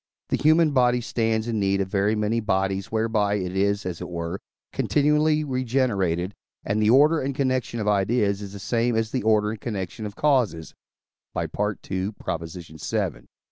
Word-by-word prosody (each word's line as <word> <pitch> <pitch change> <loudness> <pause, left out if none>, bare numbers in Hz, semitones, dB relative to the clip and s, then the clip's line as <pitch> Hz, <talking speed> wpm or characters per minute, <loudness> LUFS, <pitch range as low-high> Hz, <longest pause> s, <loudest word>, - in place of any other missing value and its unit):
the - - +2
human 155 +1 +4
body 125 -2 +3
stands 115 -1 -1
in 115 -2 -1
need 100 -1 +1
of 95 - 0
very 100 +2 +1
many 105 +2 0
bodies 95 -2 -1
whereby 110 -2 +1
it 95 -2 -3
is, 100 +1 +1
as 90 -2 -4
it 90 - -5
were, 85 +2 -4 0.3
continually 150 +1 +2
regenerated; 115 - 0 0.3
and 105 +2 0
the 105 - +3
order 150 +6 +5
and 135 0 -2
connection 130 -4 -1
of 105 - -2
ideas 100 0 +1
is 100 -1 -7
the - - -7
same 115 +4 0
as 110 0 0
the 130 - -1
order 105 -1 +2
and 110 - -7
connection 105 -1 -4
of 100 - -10
causes 125 - +1 0.7
(II. - - -1
vii.) 95 -5 -3
105 Hz, 165 wpm, -24 LUFS, 95-125 Hz, 0.7 s, order